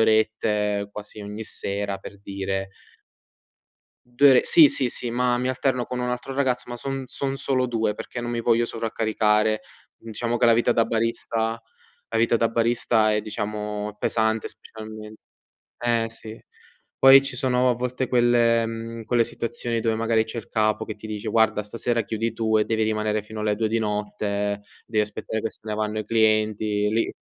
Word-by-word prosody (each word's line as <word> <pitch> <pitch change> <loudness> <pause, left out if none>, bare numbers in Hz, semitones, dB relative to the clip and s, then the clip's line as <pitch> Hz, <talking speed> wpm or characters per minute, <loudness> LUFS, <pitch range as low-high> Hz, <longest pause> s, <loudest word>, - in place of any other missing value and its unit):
orette 105 -2 +1
quasi 105 +1 -9
ogni 105 +2 -6
sera, 100 -1 -4
per 100 - -11
dire 95 -1 -4 1.5
2 145 - +8
ore 130 - +6
sì, 155 -3 +8
sì, 130 -2 0
sì, 120 - -4
ma 120 +1 +1
mi 125 +1 -1
alterno 130 -1 0
con 125 - -5
un 125 0 -1
altro 125 +2 -4
ragazzo, 130 -3 0
ma 120 - -4
son 135 +1 -4
son 135 +2 -3
solo 130 -2 0
2 115 -3 -1
perché 125 - -6
non 120 - -4
mi 120 -1 -2
voglio 115 0 +3
sovraccaricare. 110 -1 +1 0.5
Diciamo 120 +2 -1
che 120 - +3
la 115 - +6
vita 120 - +3
da 115 - +3
barista 115 0 -1 0.5
la 115 - -1
vita 115 0 +3
da 115 - +2
barista 115 -1 +2
è, 105 0 +1
diciamo, 105 0 -4
pesante 110 -1 0
specialmen 110 -1 -10 0.7
Eh, 115 -1 +2
sì. 110 -1 -10 0.6
Poi 135 0 +9
ci - - -4
sono, 125 -1 +2
a - - -1
volte, 125 +1 -2
quelle 120 -2 +3
mhmm, 115 0 -6
quelle 120 +1 +3
situazioni 115 0 -3
dove, 115 0 0
magari, 115 0 +2
c'è 110 +2 -7
il 110 - -15
capo 110 -1 +1
che 110 - -6
ti 105 - -10
dice: 105 -1 -4
“Guarda, 110 -2 +2
stasera 115 +2 -1
chiudi 115 0 -2
tu”, 110 -1 +1
e 105 - +2
devi 110 -1 0
rimanere 110 -1 0
fino 110 0 -8
alle 105 -1 +1
2 110 - 0
di 115 +1 0
notte, 105 -1 -2 0.2
devi 110 -2 +1
aspettare 105 +1 -4
che 115 - -2
se - - -9
ne 110 -1 -4
vanno 105 0 -2
i 110 - -4
clienti 110 -1 +2
lì. 115 +2 0
110 Hz, 180 wpm, -24 LUFS, 105-120 Hz, 1.5 s, Poi